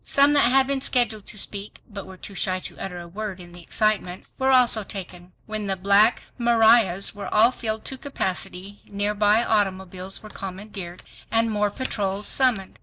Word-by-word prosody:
Some 280 +1 +4
that 280 -4 +4
had 265 0 +4
been 275 0 -1
scheduled 235 -6 0
to - - -5
speak, 200 0 -3
but 200 -2 -9
were 190 0 -12
too 200 - -9
shy 185 -1 -1
to - - -11
utter 180 -2 -6
a 170 - -9
word 200 +1 -6
in 175 -1 -12
the 175 0 -12
excitement, 190 -1 -1
were 265 0 +1
also 245 -4 +4
taken. 180 -3 -8
When 215 -2 -4
the 195 - +1
"Black 200 +5 +3 0.2
Marias" 225 -5 +4
were 205 -1 -7
all 225 +3 +5
filled 220 -3 -4
to 265 - -3
capacity, 195 -6 -3
nearby 210 +2 +1
automobiles 190 -3 -2
were 215 - -10
commandeered, 190 -2 -8 0.3
and 225 +1 +2
more 210 -1 0
patrols 205 -4 -3
summoned. 245 -8 +1
205 Hz, 180 wpm, -23 LUFS, 190-225 Hz, 0.3 s, all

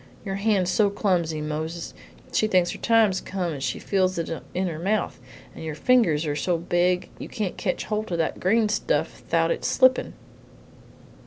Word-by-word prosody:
Your 195 -1 -3
hand's 200 -3 +1
so 210 -2 +3
clumsy, 175 -6 0
Mose, 160 +2 -4 0.4
she 215 - +3
thinks 185 -4 +2
her - - -8
time's 220 -5 +3
come 185 -3 -3
when 145 - -5
she 135 - -2
feels 185 -2 0
it 165 -1 -3 0.2
in 185 +1 0
her 160 -3 -4
mouth, 200 +5 -1 0.3
and - - -9
your 155 -2 -4
fingers 170 -7 +3
are 145 -1 -1
so 175 +3 0
big 175 +1 0
you - - -7
can't 205 -5 -3
ketch 180 - -2
holt 215 -2 -3
o' - - 0
that 165 - -1
green 215 +4 +3
stuff 215 - -1
thout - - +2
its - - -1
slippin'!" 260 -1 +3
185 Hz, 180 wpm, -25 LUFS, 165-210 Hz, 0.4 s, so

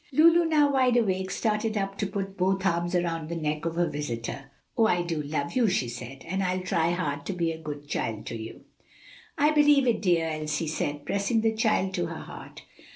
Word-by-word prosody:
Lulu, 330 +4 +6
now 300 -3 +3
wide 255 -2 +3
awake, 190 -4 +1
started 215 +2 -1
up 195 -1 -2
to 205 - 0
put 195 -1 -4
both 190 +1 0
arms 175 0 +1
round 165 -3 -1
the 170 - -3
neck 155 -1 -2
of 165 0 -2
her 175 0 +2
visitor. 135 -2 -5 0.3
"Oh, 225 -2 +4
I 175 -4 +2
do 165 -3 -2
love 145 -1 -3
you!" 245 -3 +4
she 180 -10 +1
said, 125 +3 -8
"and 190 +3 -1
I'll 185 0 0
try 170 -2 +1
hard 145 -5 -2
to 195 - -1
be 170 -2 0
a 160 0 -7
good 145 -2 -7
child 115 -7 -3
to - - -5
you." 110 0 -8 0.8
"I 295 +2 +4
believe 295 -2 +5
it, 240 -2 +1
dear," 175 -4 +2
Elsie 155 0 -2
said, 145 -2 -3
pressing 200 +3 +1
the 220 0 +2
child 220 -4 +1
to 175 -2 -1
her 165 -1 -6
heart. - - -10
175 Hz, 215 wpm, -27 LUFS, 155-215 Hz, 0.8 s, Lulu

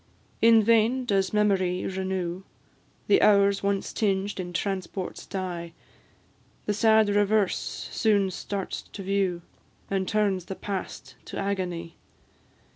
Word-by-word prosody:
In 225 -1 +6
vain 230 +3 +3
does 195 -4 +1
memory 195 -4 +1
renew 185 -1 -3 0.6
The 395 - +4
hours 200 -1 +4
once 200 -1 -1
tinged 200 -1 0
in 175 -1 -4
transport's 190 +1 -4
dye; 175 -3 -5 0.9
The 210 - 0
sad 220 0 +4
reverse 205 -1 +1
soon 200 -4 +2
starts 195 +1 -4
to 195 - -10
view, 190 -3 0 0.5
And 190 -1 0
turns 200 -4 +1
the 190 - -6
past 175 -11 -6
to - - -7
agony. 180 -4 -3
195 Hz, 120 wpm, -26 LUFS, 185-210 Hz, 0.9 s, In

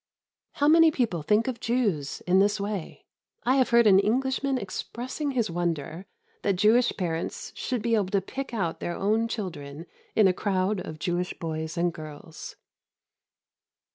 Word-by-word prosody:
How 290 - +1
many 325 +1 +7
people 235 - -1
think 210 - +2
of 255 -3 -3
Jews 205 - -1
in 185 +1 +3
this 205 +1 +3
way! 200 -3 -5 0.4
I 255 +2 +3
have 260 - +3
heard 235 -1 +5
an 195 -2 +7
Englishman 265 +5 +1
expressing 250 +7 -4
his 235 -8 0
wonder 170 +1 -3 0.3
that 200 -2 +1
Jewish 220 +6 +4
parents 165 -3 -3
should 250 -4 -3
be 235 -1 +1
able 210 -4 +2
to 200 0 +2
pick 270 +7 -6
out 185 -8 -2
their 175 - -3
own 220 +3 +1
children 165 -9 -6 0.3
in 215 -3 +6
a 185 - +3
crowd 190 +1 0
of 155 -3 -7
Jewish 175 +2 -2
boys 160 0 -4
and 170 0 +1
girls. 155 0 -9
200 Hz, 160 wpm, -27 LUFS, 170-235 Hz, 0.4 s, many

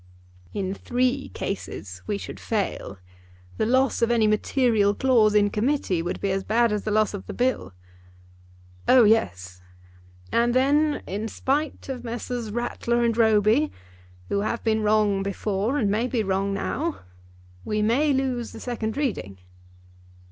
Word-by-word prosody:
"In 190 -1 -2
three 255 +5 -1
cases 95 - -6
we 205 - -1
should - - -8
fail. 200 - -3 0.6
The - - +1
loss 260 +1 +2
of 230 - +3
any 235 -2 +3
material 215 -1 +2
clause 230 -5 +3
in 205 -1 +4
Committee 215 - 0
would 175 +1 -3
be 200 - -1
as 195 0 -1
bad 230 +2 +2
as 210 -1 -2
the - - -1
loss 215 0 +2
of 200 - -7
the - - -6
Bill." 245 - -1 1.1
"Oh, 255 -2 +7
yes." 90 - +1 0.7
"And 235 +1 +2
then, 290 +3 +2
in 210 +4 -4
spite 280 +6 -2
of 255 -3 -5
Messrs. 240 -1 -4
Rattler 240 +1 -1
and 230 -1 +1
Roby, 220 +5 +3 0.6
who 200 - 0
have 215 +3 -2
been 220 -1 +1
wrong 210 -2 +2
before 200 +5 -1
and 210 -7 +1
may 225 +4 +1
be 245 -4 -1
wrong 195 0 0
now, 300 +11 -2 0.6
we 210 0 -1
may 270 +8 +2
lose 260 -3 -1
the - - -9
second 230 -2 -4
reading." 150 - -2
220 Hz, 150 wpm, -25 LUFS, 200-250 Hz, 1.1 s, Oh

